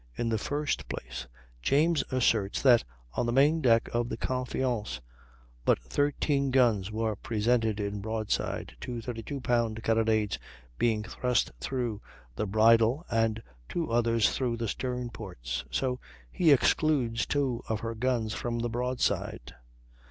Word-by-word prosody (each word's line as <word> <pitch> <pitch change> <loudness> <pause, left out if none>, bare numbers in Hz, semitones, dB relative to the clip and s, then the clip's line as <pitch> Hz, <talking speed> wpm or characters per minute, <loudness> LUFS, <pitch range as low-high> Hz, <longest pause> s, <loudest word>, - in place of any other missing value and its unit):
In 115 - -1
the 110 -1 0
first 145 +6 -2
place, - - -6 0.3
James 150 - +3
asserts 115 -6 +2
that 125 -4 +6 0.3
on 120 - 0
the - - +1
main 145 +6 +4
deck 115 -4 +4
of 120 0 0
the - - -3
Confiance 125 - -2 0.6
but - - +4
13 140 - +1
guns 115 -7 +3
were 110 0 -1
presented 110 0 0
in 100 0 -3
broadside, 110 0 -2
two 120 -1 -5
32 120 +4 -5
pound 115 -3 0
carronades 110 -2 +1 0.4
being 110 -3 +2
thrust 125 +2 0
through 120 - -2 0.3
the 105 - -2
bridle 115 - +4
and 115 -1 +1 0.3
two 165 -7 -2
others 115 -1 +3
through 120 -3 -1
the 115 0 -2
stern 125 +2 -3
ports; 70 - -5
so 125 -1 -1 0.3
he 165 -4 +4
excludes 130 -4 +2
two 135 -5 0
of 110 -1 -1
her 115 0 -3
guns 115 -2 0
from 120 +1 -2
the 120 0 -1
broadside. 125 +2 -1
115 Hz, 140 wpm, -29 LUFS, 110-130 Hz, 0.6 s, that